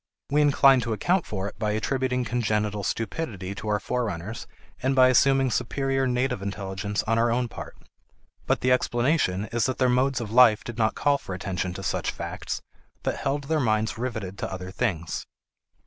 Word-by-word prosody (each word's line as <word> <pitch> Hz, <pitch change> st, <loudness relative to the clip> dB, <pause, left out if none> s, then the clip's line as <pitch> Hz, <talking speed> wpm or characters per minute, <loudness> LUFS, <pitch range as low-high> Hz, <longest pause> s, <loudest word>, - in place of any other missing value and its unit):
We 150 Hz, +1 st, +4 dB
incline 140 Hz, -3 st, +5 dB
to 115 Hz, -1 st, -2 dB
account 175 Hz, -, +1 dB
for 100 Hz, -2 st, -3 dB
it 105 Hz, -, -10 dB
by 105 Hz, -1 st, 0 dB
attributing 125 Hz, +2 st, 0 dB
congenital 105 Hz, -3 st, -1 dB
stupidity 105 Hz, -, -3 dB
to 100 Hz, -, -7 dB
our 105 Hz, -1 st, +1 dB
forerunners 110 Hz, -2 st, -3 dB, 0.3 s
and 130 Hz, +1 st, +1 dB
by 130 Hz, -1 st, +7 dB
assuming 135 Hz, +1 st, +4 dB
superior 135 Hz, +2 st, 0 dB
native 125 Hz, -2 st, 0 dB
intelligence 100 Hz, +1 st, -3 dB
on 115 Hz, +1 st, +1 dB
our 120 Hz, +1 st, +3 dB
own 120 Hz, +1 st, +1 dB
part. -, -, -9 dB, 0.7 s
But -, -, +1 dB
the 125 Hz, -, +2 dB
explanation 120 Hz, -, +1 dB
is 120 Hz, 0 st, +1 dB
that 130 Hz, -, -2 dB
their 130 Hz, -1 st, +3 dB
modes 130 Hz, +2 st, +2 dB
of 110 Hz, -3 st, -5 dB
life 115 Hz, -3 st, +6 dB
did 120 Hz, -1 st, -7 dB
not 110 Hz, -1 st, +2 dB
call 145 Hz, -1 st, +2 dB
for 90 Hz, -, -6 dB
attention 90 Hz, -1 st, -3 dB
to 95 Hz, -, -6 dB
such 85 Hz, -, -1 dB
facts, -, -, -5 dB, 0.4 s
but -, -, 0 dB
held 145 Hz, +1 st, -1 dB
their 155 Hz, +2 st, 0 dB
minds 110 Hz, -4 st, +1 dB
riveted 110 Hz, -6 st, -4 dB
to -, -, -3 dB
other 95 Hz, 0 st, -6 dB
things. 85 Hz, -4 st, -2 dB
115 Hz, 180 wpm, -26 LUFS, 105-130 Hz, 0.7 s, by